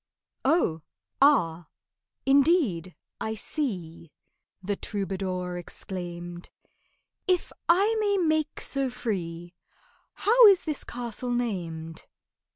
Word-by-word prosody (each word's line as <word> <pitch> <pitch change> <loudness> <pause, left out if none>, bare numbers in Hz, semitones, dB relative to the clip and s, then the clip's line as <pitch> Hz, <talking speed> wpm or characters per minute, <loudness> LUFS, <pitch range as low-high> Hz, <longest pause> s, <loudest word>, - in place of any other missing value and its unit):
"Oh, 265 - +2 0.4
ah!—indeed—I 220 - +1
see," 180 - -4 0.5
The 200 +2 -1
troubadour 190 -3 -3
exclaimed— 175 -1 -7 0.8
"If 365 -2 +1 0.2
I 400 +6 +4
may 405 -2 +2
make 315 -4 +1
so 275 -1 -1
free, 175 -8 -4 0.6
How 465 +2 +6
is 390 -3 +5
this 305 -3 -2
castle 240 0 -5
named?" 170 -9 -3
210 Hz, 80 wpm, -27 LUFS, -, 0.8 s, How